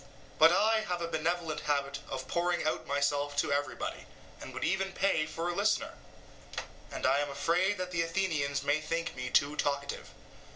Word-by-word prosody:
But - - +9
I 220 +1 +4
have 180 -5 -2
a 170 - -2
benevolent 165 0 -1
habit 140 -1 -1
of 130 -1 -4
pouring 175 0 0
out 155 - -1
myself 145 0 0
to 145 - +2
everybody, 145 0 -2 0.3
and - - -7
would - - -5
even 190 0 0
pay 190 -6 +2
for 165 +2 -3
a 175 - 0
listener, - - +1 1.0
and - - -4
I 135 +2 +4
am 145 0 -1
afraid 180 +8 +1
that 185 0 -4
the 170 -2 +1
Athenians 160 -5 0
may 145 +2 +2
think 165 +2 -2
me 125 -1 -4
too 145 +3 +3
talkative. 140 -1 -2
155 Hz, 175 wpm, -31 LUFS, 140-175 Hz, 1.0 s, But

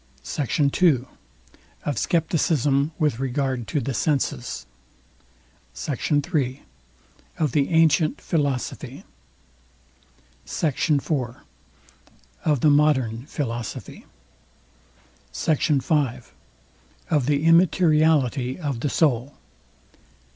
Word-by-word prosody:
SECT. 140 - -1
II. 140 -9 +4 0.8
OF 145 - -1
SCEPTICISM 150 0 +1
WITH 150 -8 0
REGARD 130 -2 -2
TO 150 - -1
THE 135 0 -3
SENSES. 135 - -1 1.1
SECT. 135 - -4 0.2
III. 130 -3 -1 0.7
OF 155 -5 0
THE 140 0 +1
ANTIENT 160 -1 +3
PHILOSOPHY. 145 -6 -2 1.4
SECT. 155 0 -1
IV. 145 +1 +1 1.3
OF 150 -4 +2
THE 150 - +5
MODERN 130 -5 +2
PHILOSOPHY. 120 -8 -5 1.3
SECT. 150 - 0
V. 150 0 +2 1.1
OF 150 -5 +2
THE 145 +1 +1
IMMATERIALITY 155 -7 +3
OF 145 -8 -3
THE 140 - -1
SOUL. 135 -3 +1
145 Hz, 85 wpm, -23 LUFS, 130-155 Hz, 1.4 s, THE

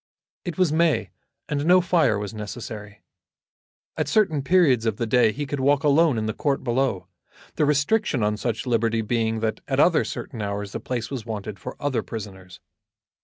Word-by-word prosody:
It 175 -1 -4
was 185 -5 +3
May, 160 - +2 0.4
and 145 -1 -1
no 180 +1 +7
fire 170 - +2
was 105 +1 -5
necessary. 105 -1 -8 0.9
At - - -1
certain 175 -10 +2
periods 140 -8 +3
of 110 -2 0
the 115 - -1
day 115 0 +4
he 145 +6 -4
could 145 0 -4
walk 140 +1 +2
alone 150 -2 +4
in 110 - -1
the 110 - -2
court 140 +3 -1
below, 125 -5 0 0.5
the 150 - +1
restriction 145 - +1
on 105 0 +1
such 110 +3 -3
liberty 115 -2 +1
being 110 0 -1
that 110 -1 -1
at 135 -1 0
other 170 +1 +4
certain 115 -5 -6
hours 100 0 -3
the - - -4
place 120 -1 -4
was 120 -5 -5
wanted 105 -2 -5
for - - -7
other 145 -4 0
prisoners. 95 -5 -9
120 Hz, 180 wpm, -24 LUFS, 110-145 Hz, 0.9 s, no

